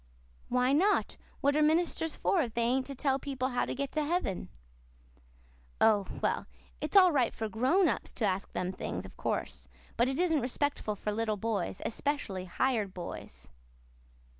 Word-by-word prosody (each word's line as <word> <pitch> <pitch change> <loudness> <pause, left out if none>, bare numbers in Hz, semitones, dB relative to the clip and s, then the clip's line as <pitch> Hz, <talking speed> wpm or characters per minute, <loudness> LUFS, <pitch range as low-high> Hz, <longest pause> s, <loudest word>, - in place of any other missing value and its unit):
"Why 250 +2 +3
not? 385 +8 +3 0.3
What 285 +1 +3
are 305 - +3
ministers 320 +1 +2
for 365 - +2
if 235 -6 -3
they 235 - +1
ain't 260 +3 +1
to 275 - -6
tell 270 +1 +1
people 265 -2 -2
how 245 - 0
to - - -4
get 275 +1 -3
to 310 - 0
heaven?" 290 - -1 1.3
"Oh, 210 -3 +4 0.2
well, - - 0 0.3
it's 310 +7 +1
all 370 -2 +8
right 260 -6 +2
for 220 - -2
grown 260 - +3
ups - - -2
to 225 - -1
ask 195 0 -1
them 180 0 -1
things, 190 - -5
of - - -12
course. - - -3 0.3
But 240 +2 +3
it 270 - -2
isn't 325 -5 +2
respectful 255 -3 -1
for 210 - -3
little 215 0 -1
boys 205 -4 -2
especially 230 -8 -2
hired 210 0 0
boys." 65 - -8
255 Hz, 170 wpm, -31 LUFS, 210-295 Hz, 1.3 s, all